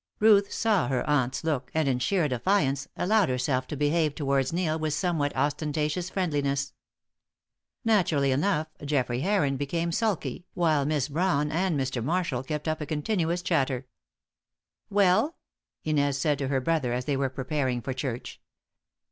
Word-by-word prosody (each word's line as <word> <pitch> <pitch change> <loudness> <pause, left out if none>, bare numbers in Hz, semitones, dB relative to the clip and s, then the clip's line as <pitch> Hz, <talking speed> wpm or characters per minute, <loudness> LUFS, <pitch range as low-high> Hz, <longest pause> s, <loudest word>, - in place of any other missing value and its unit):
Ruth 205 -2 +5
saw 215 -6 +1
her 130 -2 -1
aunt's 135 -2 +1
look, 150 -5 -1
and, 160 -2 +2
in 130 -2 +1
sheer 170 +5 +1
defiance, 135 - +1
allowed 205 -2 +3
herself 130 0 0
to 150 - -5
behave 150 +1 +1
towards 135 -3 0
Neil 165 -2 0
with 155 -1 -1
a - - -3
somewhat 150 -4 0
ostentatious 150 +4 -1
friendliness. 140 -7 -1 1.1
Naturally 170 -11 +3
enough, 155 +3 +1 0.2
Geoffrey 130 -4 0
Heron 155 -7 +1
became 165 +5 -1
sulky, 180 - -2
while 155 -5 +2
Miss 150 -3 0
Brawn 150 -1 0
and 170 -2 0
Mr. 130 -3 -2
Marshall 165 -3 0
kept 150 +3 -4
up 155 0 -1
a 150 - -4
continuous 170 +2 -1
chatter. 135 -7 0 1.0
"Well?" 200 - +3 0.5
Inez 145 -3 +1
said 145 0 +1
to 135 - -1
her 135 0 +1
brother 145 -5 0
as 125 +1 -2
they 145 - 0
were 135 0 0
preparing 130 -1 -1
for 130 +2 -4
church. 130 -2 -5
150 Hz, 155 wpm, -27 LUFS, 135-170 Hz, 1.1 s, Ruth